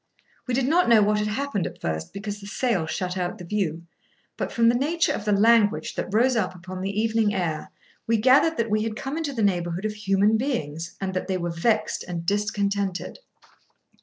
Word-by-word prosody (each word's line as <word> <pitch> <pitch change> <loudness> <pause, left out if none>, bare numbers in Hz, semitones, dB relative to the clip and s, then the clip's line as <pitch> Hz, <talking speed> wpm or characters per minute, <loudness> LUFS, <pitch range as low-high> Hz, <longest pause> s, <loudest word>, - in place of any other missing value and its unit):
We 250 - 0
did 260 0 +1
not 345 +2 +3
know 225 -3 +6
what 210 +1 +2
had 210 - 0
happened 210 -3 -2
at - - -10
first, 80 0 -3
because 205 +1 -6
the 200 - -9
sail 205 -7 0
shut 180 +2 -3
out 175 0 -2
the 180 - -9
view, 170 -4 -2 0.5
but - - -3
from 230 0 +3
the 235 - +5
nature 305 +7 +1
of 205 - -5
the 210 - +1
language 215 +1 +3
that - - -4
rose 245 +5 +3
up 220 -4 -1
upon 185 +1 -8
the 195 +2 -2
evening 220 -2 +1
air, 165 -5 -2 0.4
we 230 0 +3
gathered 265 +8 +4
that 230 -2 -1
we 215 0 +2
had 220 0 -2
come 270 +5 -4
into 320 -3 -2
the 230 -5 -2
neighbourhood 175 -1 0
of 215 - -1
human 210 +1 +2
beings, 170 - -3
and 190 -1 -3
that 185 - -3
they 190 -1 0
were 175 -1 -3
vexed 215 +7 0
and 170 -1 -4
discontented. 200 -1 -1
210 Hz, 210 wpm, -25 LUFS, 185-230 Hz, 0.5 s, know